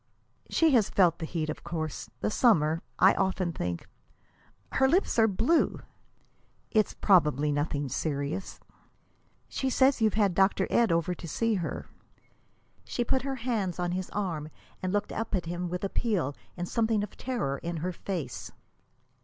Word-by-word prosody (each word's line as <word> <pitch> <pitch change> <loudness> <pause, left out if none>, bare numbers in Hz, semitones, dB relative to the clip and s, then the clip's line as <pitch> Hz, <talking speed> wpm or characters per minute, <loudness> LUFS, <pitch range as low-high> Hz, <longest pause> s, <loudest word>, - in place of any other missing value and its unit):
"She 325 -2 +4
has 230 -6 +4
felt 175 -4 +3
the 160 - -4
heat, 160 -2 -2
of 155 - -5
course. 160 -3 -4
The - - 0
summer 165 - +3 0.2
I 190 +2 +6
often 185 -2 0
think 85 - -4 0.4
" 100 - -34
"Her 265 - +6
lips 340 -4 +2
are 225 - +6
blue!" 230 - +2 0.9
"It's 215 -2 +2
probably 150 -6 +3
nothing 145 0 -1
serious." 145 +6 -3 0.9
"She 265 - -2
says 260 0 +3
you've 215 -2 +3
had 205 -4 +3
Dr. 190 +1 +3
Ed 235 -4 +4
over 170 +1 +1
to 175 - -8
see 230 +8 0
her." 180 -5 -3 1.0
She 240 - -2
put 260 +2 +1
her 270 0 -3
hands 205 -8 -1
on 175 -1 -1
his 185 0 -3
arm 165 -7 -3 0.3
and 185 - -1
looked 205 +1 -1
up 225 -1 -2
at 180 - -1
him 175 +1 -3
with 180 +2 -4
appeal 195 - 0 0.2
and 175 0 -3
something 220 -1 +1
of 210 - -7
terror 185 - -2
in 170 0 -4
her 185 - 0
face. 170 -8 -5
185 Hz, 160 wpm, -29 LUFS, 165-220 Hz, 1.0 s, I